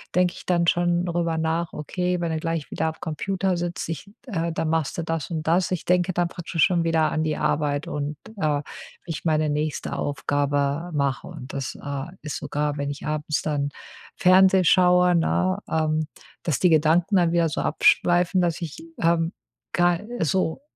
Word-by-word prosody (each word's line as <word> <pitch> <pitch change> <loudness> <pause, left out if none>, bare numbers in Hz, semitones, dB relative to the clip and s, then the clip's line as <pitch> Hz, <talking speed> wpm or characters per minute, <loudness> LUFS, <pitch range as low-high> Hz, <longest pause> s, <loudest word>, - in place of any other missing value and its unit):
denke 180 -1 +3
ich - - -11
dann 175 -1 +2
schon 175 0 +2
darüber 170 -2 -1
nach: 160 +1 -1
„Okay, 180 +4 -2
wenn 170 -1 -1
du 160 - -1
gleich 165 -2 -3
wieder 160 - -1
am 160 - -3
Computer 185 +3 -1
sitzt, 175 0 -3
ich 165 +5 -6 0.2
äh, 170 -7 -1
dann 160 -1 -2
machst 160 -3 0
du 170 - -2
das 165 -1 -3
und 160 -2 -2
das.“ 175 +2 +3
Ich 180 - -2
denke 180 +1 +2
dann 175 0 +1
praktisch 170 -1 -1
schon 175 -2 +3
wieder 165 -1 +2
an 155 - 0
die 155 -1 -1
Arbeit 145 -1 0
und, 145 0 -3 0.2
äh, - - -7 0.6
wie 170 - -5
ich 155 - -5
meine 155 -1 +2
nächste 150 0 -2
Aufgabe 145 +2 -1
mache. 140 -3 -1
Und 145 -7 -9
das, 135 -2 -4
äh, 140 -1 -4 0.2
ist 150 - -4
sogar, 145 0 -2
wenn 140 0 -2
ich 145 - -8
abends 150 0 -1
dann 145 -2 -1 0.5
Fernsehen 185 0 +6
schaue, 180 0 +5
ne, 185 +3 +1
ähm, 155 -1 0 0.4
dass 155 -5 0
die 180 - +4
Gedanken 165 +5 +3
dann 175 -2 +3
wieder 170 -1 +3
so - - -2
abschweifen, 175 +4 +3
dass 175 -1 0
ich, 160 -4 -6 0.2
ähm, 165 0 +2 0.4
ga 175 -1 +3 0.2
so, 165 - 0
165 Hz, 185 wpm, -24 LUFS, 150-175 Hz, 0.6 s, Fernsehen